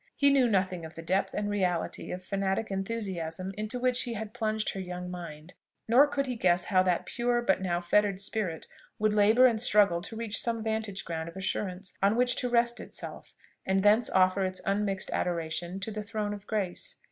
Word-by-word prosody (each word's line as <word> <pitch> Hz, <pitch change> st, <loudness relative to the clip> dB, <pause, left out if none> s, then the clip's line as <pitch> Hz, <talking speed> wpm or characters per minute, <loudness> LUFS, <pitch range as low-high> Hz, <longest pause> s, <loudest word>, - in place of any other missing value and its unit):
He 280 Hz, 0 st, +4 dB
knew 270 Hz, -3 st, +4 dB
nothing 185 Hz, -4 st, 0 dB
of 160 Hz, 0 st, -9 dB
the 165 Hz, -, -8 dB
depth 190 Hz, +4 st, 0 dB
and 205 Hz, 0 st, -1 dB
reality 185 Hz, -5 st, -1 dB
of 185 Hz, +1 st, -5 dB
fanatic 195 Hz, +2 st, -1 dB
enthusiasm 190 Hz, -3 st, -3 dB
into 215 Hz, +3 st, -3 dB
which 250 Hz, 0 st, +2 dB
he 240 Hz, -, -2 dB
had 215 Hz, 0 st, -6 dB
plunged 220 Hz, -2 st, -1 dB
her 195 Hz, -, -6 dB
young 180 Hz, -1 st, -5 dB
mind; 170 Hz, -2 st, -8 dB, 0.3 s
nor 255 Hz, +6 st, +6 dB
could 280 Hz, -1 st, -1 dB
he 250 Hz, -2 st, -3 dB
guess 175 Hz, -5 st, +2 dB
how 185 Hz, -2 st, +3 dB
that 180 Hz, -2 st, +1 dB
pure, 240 Hz, 0 st, 0 dB
but 190 Hz, -4 st, +2 dB
now 175 Hz, -2 st, 0 dB
fettered 195 Hz, +2 st, +2 dB
spirit, 200 Hz, -5 st, -3 dB, 0.3 s
would 215 Hz, 0 st, +2 dB
labour 215 Hz, +4 st, +6 dB
and 230 Hz, -3 st, +3 dB
struggle 200 Hz, -7 st, +4 dB
to 210 Hz, +4 st, -7 dB
reach 220 Hz, -2 st, -1 dB
some 230 Hz, -2 st, -2 dB
vantage 220 Hz, -3 st, -3 dB
ground 165 Hz, -1 st, -4 dB
of 170 Hz, -, -12 dB
assurance 190 Hz, 0 st, -3 dB
on 200 Hz, +2 st, +4 dB
which 245 Hz, +1 st, +2 dB
to 250 Hz, -, 0 dB
rest 235 Hz, 0 st, +2 dB
itself, -, -, -9 dB, 0.3 s
and 190 Hz, 0 st, +1 dB
thence 215 Hz, +3 st, +4 dB
offer 185 Hz, +1 st, +3 dB
its 185 Hz, 0 st, -2 dB
unmixed 195 Hz, -1 st, -1 dB
adoration 170 Hz, +1 st, -2 dB
to 220 Hz, -, -4 dB
the 215 Hz, 0 st, -4 dB
throne 210 Hz, -1 st, -3 dB
of 205 Hz, 0 st, -9 dB
grace. 195 Hz, -5 st, -2 dB
200 Hz, 200 wpm, -29 LUFS, 185-220 Hz, 0.3 s, nor